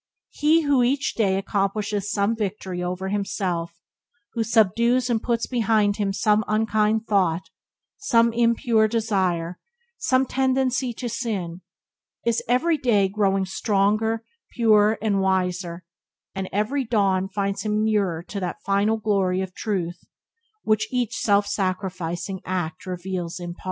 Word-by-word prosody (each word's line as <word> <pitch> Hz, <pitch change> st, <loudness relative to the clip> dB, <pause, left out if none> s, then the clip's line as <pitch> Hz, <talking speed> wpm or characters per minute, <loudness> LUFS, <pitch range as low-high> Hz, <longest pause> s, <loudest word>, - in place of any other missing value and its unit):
He 310 Hz, +3 st, +3 dB
who 285 Hz, -3 st, +3 dB
each 270 Hz, +3 st, +1 dB
day 195 Hz, -4 st, +1 dB
accomplishes 200 Hz, +1 st, -1 dB
some 200 Hz, +3 st, +1 dB
victory 190 Hz, -4 st, -4 dB
over 180 Hz, +2 st, -3 dB
himself, 185 Hz, -4 st, -2 dB, 0.6 s
who 230 Hz, -, 0 dB
subdues 230 Hz, +3 st, +2 dB
and 225 Hz, -2 st, +1 dB
puts 235 Hz, -1 st, 0 dB
behind 220 Hz, -4 st, +1 dB
him 205 Hz, -2 st, 0 dB
some 210 Hz, +2 st, +2 dB
unkind 215 Hz, 0 st, +1 dB
thought, 185 Hz, -5 st, +1 dB, 0.5 s
some 235 Hz, -, +3 dB
impure 230 Hz, -1 st, +3 dB
desire, 190 Hz, -6 st, -1 dB, 0.4 s
some 260 Hz, 0 st, +2 dB
tendency 260 Hz, -1 st, 0 dB
to 245 Hz, +2 st, -5 dB
sin, 205 Hz, -7 st, -3 dB, 0.6 s
is 235 Hz, -1 st, +1 dB
everyday 250 Hz, -, +2 dB
growing 195 Hz, -1 st, +1 dB
stronger, 215 Hz, +3 st, 0 dB, 0.3 s
purer, 215 Hz, -2 st, +4 dB
and 200 Hz, -3 st, +1 dB
wiser, 180 Hz, -2 st, -1 dB, 0.5 s
and 190 Hz, -1 st, -4 dB
every 215 Hz, +8 st, 0 dB
dawn 195 Hz, -5 st, +1 dB
finds 200 Hz, 0 st, -2 dB
him 215 Hz, 0 st, 0 dB
nearer 200 Hz, -7 st, 0 dB
to 200 Hz, +3 st, -6 dB
that 180 Hz, -2 st, -5 dB
final 200 Hz, +3 st, +2 dB
glory 195 Hz, -4 st, +1 dB
of 190 Hz, -1 st, -5 dB
Truth 180 Hz, -5 st, -3 dB, 0.6 s
which 215 Hz, 0 st, +1 dB
each 250 Hz, -3 st, -1 dB
self 205 Hz, -1 st, +2 dB
sacrificing 185 Hz, -2 st, -3 dB
act 180 Hz, -2 st, -4 dB
reveals 180 Hz, -1 st, -4 dB
in 175 Hz, -1 st, -5 dB
part. -, -, -22 dB
205 Hz, 130 wpm, -24 LUFS, 190-225 Hz, 0.6 s, purer